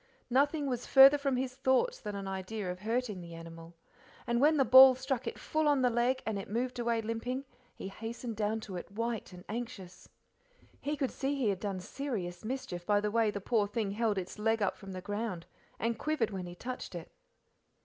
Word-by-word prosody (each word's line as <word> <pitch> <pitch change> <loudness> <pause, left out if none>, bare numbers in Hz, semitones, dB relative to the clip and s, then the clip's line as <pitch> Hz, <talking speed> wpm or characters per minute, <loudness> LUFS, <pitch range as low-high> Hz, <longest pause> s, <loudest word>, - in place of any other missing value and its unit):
Nothing 285 +3 +2
was 250 -3 -3
further 270 +2 +8
from 275 -2 0
his 255 0 -2
thoughts 265 - +1
than 210 -1 -5
an 195 -1 -5
idea 190 +1 -4
of 180 - -7
hurting 220 -2 -2
the 170 -1 -9
animal, 165 0 -10 0.5
and 235 +1 +1
when 305 +2 +5
the 270 - +4
ball 260 +2 +10
struck 260 -1 -3
it - - -4
full 310 0 0
on 285 -3 +3
the 250 - +4
leg, 245 +3 +1
and 215 -2 -2
it 195 - -8
moved 245 +3 -2
away 235 -1 0
limping, 245 +4 -3 0.3
he - - -6
hastened 225 +3 -6
down 215 +1 -1
to 195 -4 -6
it, - - -7
white 230 0 -3
and 180 0 -12
anxious. 210 -5 -7 0.7
He 295 +1 -3
could 270 -2 -1
see 275 +1 -2
he 255 -6 +1
had 195 -2 -1
done 195 -2 -3
serious 185 -5 -5
mischief 220 -7 -4
by 205 +3 +3
the 210 0 -1
way 225 -1 +3
the 205 - -3
poor 210 0 +1
thing 205 -1 -2
held 215 0 0
its 185 +2 -5
leg 225 +1 +2
up 205 -3 0
from 195 -2 -9
the 185 - -6
ground 205 -3 -4 0.3
and 230 -1 -1
quivered 300 -8 0
when 185 -2 -5
he 175 - -8
touched 250 -1 -6
it. 170 - -8
225 Hz, 210 wpm, -32 LUFS, 195-255 Hz, 0.7 s, ball